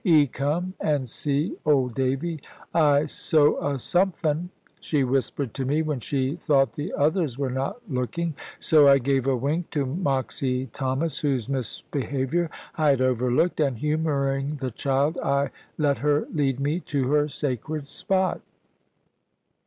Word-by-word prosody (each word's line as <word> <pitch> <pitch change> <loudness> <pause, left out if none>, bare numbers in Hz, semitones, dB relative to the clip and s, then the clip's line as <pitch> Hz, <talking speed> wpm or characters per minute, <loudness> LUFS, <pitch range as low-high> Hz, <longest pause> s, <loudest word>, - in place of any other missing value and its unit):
"'E 160 -6 +6
come 150 +7 -2
and 145 -4 0
see, 145 - -1
old 135 -5 +2
Davy. 135 +6 -1 0.3
I 150 -3 +4
sow 150 0 +2
'a 140 -1 -1
sompfin," 175 +1 0 0.3
she 145 -4 0
whispered 130 -1 -1
to 135 - -3
me, 145 +5 +1
when 150 -4 -2
she 135 +3 -1
thought 140 -5 +2
the 150 +5 -4
others 150 -3 +1
were 140 -2 -1
not 135 - -4
looking, 140 +5 -2 0.2
so 150 -3 +5
I 140 0 +8
gave 135 0 0
a 135 - +3
wink 150 +7 -1
to 145 -3 -1
Moxy 130 -3 -1
Thomas, 135 +4 -2
whose 135 -6 0
misbehaviour 140 +4 -2 0.3
I 155 -2 +3
had 135 -2 +3
overlooked, 130 +7 +1
and 140 -5 +1
humouring 145 -1 0
the 130 -3 -4
child 140 +6 0
I 140 +1 +1 0.3
let 145 -3 +1
her 145 +1 +2
lead 135 -4 +1
me 145 +5 0
to 140 -6 -1
her 150 0 +3
sacred 145 +1 -3
spot. 185 +4 -1
140 Hz, 145 wpm, -25 LUFS, 135-155 Hz, 0.3 s, I